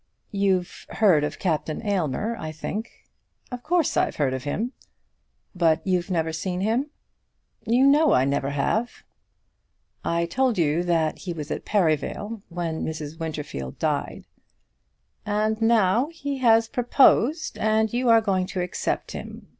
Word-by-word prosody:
"You've 195 -3 -1
heard 185 -9 +3
of 150 - -3
Captain 160 +2 -2
Aylmer, 200 - -1
I 155 0 -5
think." 205 +8 -6 0.5
"Of 250 -1 -5
course 335 +2 +1
I've - - +1
heard 135 -3 0
of 130 +1 -5
him." 220 - -2 0.8
"But 165 -3 +2
you've 180 -1 0
never 160 -3 0
seen 180 +2 -3
him?" 235 +8 0 0.8
"You 245 +4 +4
know 295 +2 +5
I 130 - +4
never 140 0 0
have." 210 +12 -1 1.0
"I 170 0 0
told 250 +6 0
you 160 0 +2
that 165 -3 +1
he 180 -3 -5
was 150 -2 -6
at - - -4
Perivale 205 +4 0
when 170 -2 -3
Mrs. 155 0 -5
Winterfield 150 - -5
died." - - -2 1.0
"And 215 +1 0
now 225 +2 +3
he 285 -4 -5
has 225 -2 +4
proposed, 260 +5 +3
and 220 0 +1
you 245 0 +1
are 225 -1 +6
going 190 -4 0
to 190 - -4
accept 180 0 -3
him? - - -9
190 Hz, 145 wpm, -24 LUFS, 160-230 Hz, 1.0 s, are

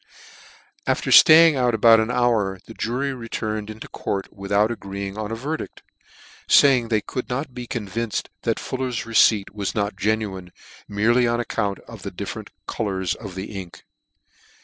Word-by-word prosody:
After - - 0
flaying 160 0 +8
out 125 -2 +2
about 115 +1 +6
an 110 +1 0
hour, 115 -6 +1
the 115 - -11
jury 125 +6 -2
re 115 -3 -9
turned 110 -1 -3
into 110 +1 -8
court 95 -1 -4
without 100 +2 +1
agreeing 100 -3 -6
on 110 0 -5
a - - -2
verdict, 145 +7 -5 0.7
faying 130 -4 +5
they 110 -2 +2
could 125 - -5
not 130 +1 -3
be 125 -1 -7
convinced 115 -1 -4
that - - -1
Fuller's 130 -3 -3
receipt 110 -3 +3
was 100 -2 -3
not 105 -1 -1
genuine, 100 -3 -2 0.4
merely 115 +4 +2
on 120 0 0
account 100 -4 -2
of - - -12
the - - -5
different - - -7 0.2
colours 95 -5 -2
of 100 -5 -9
the 95 +3 -6
ink. 85 -3 -14
110 Hz, 160 wpm, -23 LUFS, 100-120 Hz, 0.7 s, flaying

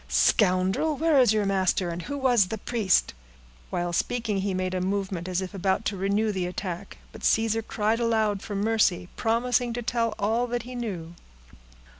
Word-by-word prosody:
Scoundrel! 185 - +2
where 315 -2 +3
is 245 -5 +5
your 215 -1 +1
master, 190 -2 +1
and 170 +1 -5
who 285 +11 -5
was 245 -7 +3
the 220 +3 -4
priest?" 210 -3 +1 0.6
While 175 0 -2
speaking, 225 +1 -1
he 195 +1 -1
made 185 0 -2
a 185 - -1
movement 190 -2 -2
as 185 0 -1
if 185 - -7
about 195 +2 0
to 205 - -1
renew 200 +3 0
the 185 -3 -2
attack; 180 +1 -6
but - - -12
Caesar 225 0 +2
cried 220 +1 -1
aloud 220 -4 +1
for 205 - -6
mercy, 200 -4 +1
promising 240 +1 +1
to 240 +1 -4
tell 230 -1 0
all 225 +4 0
that 240 -1 -2
he 250 +1 -9
knew. 190 -9 -5
205 Hz, 180 wpm, -26 LUFS, 185-230 Hz, 0.6 s, is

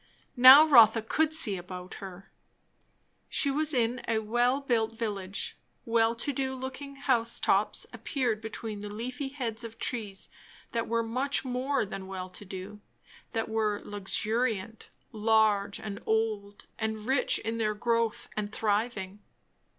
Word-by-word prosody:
Now 260 +4 +10
Rotha 230 -6 +7
could 315 +7 +1
see 260 -12 +2
about 180 +1 -8
her. 190 0 -10 1.0
She 280 - +2
was 305 +2 +1
in 245 -2 +1
a 225 - +1
well 240 +5 +1
built 230 -5 0
village. 200 -4 -4 0.3
Well 230 0 +2
to 280 +5 -2
do 265 0 -2
looking 260 +2 -7
house 240 -4 +2
tops - - +1
appeared 245 -7 -2
between 220 -1 -6
the 210 - -6
leafy 250 +6 -5
heads 245 -5 -4
of 230 -1 -8
trees 210 -6 -3 0.4
that 230 -1 -2
were 230 0 0
much 265 +5 -1
more 255 0 0
than 195 -1 -7
"well 185 -1 -6
to 205 - -10
do"; 195 +2 -8 0.5
that 225 -1 -1
were 215 -2 0
luxuriant, 215 +1 -2 0.2
large, 215 -2 +2
and 205 -2 -6
old, 215 -2 -1
and 220 -1 -3
rich 265 +1 +2
in 225 +1 -4
their 215 -1 0
growth 230 0 0
and 210 -1 -3
thriving. 210 -2 -1
225 Hz, 145 wpm, -29 LUFS, 210-250 Hz, 1.0 s, Now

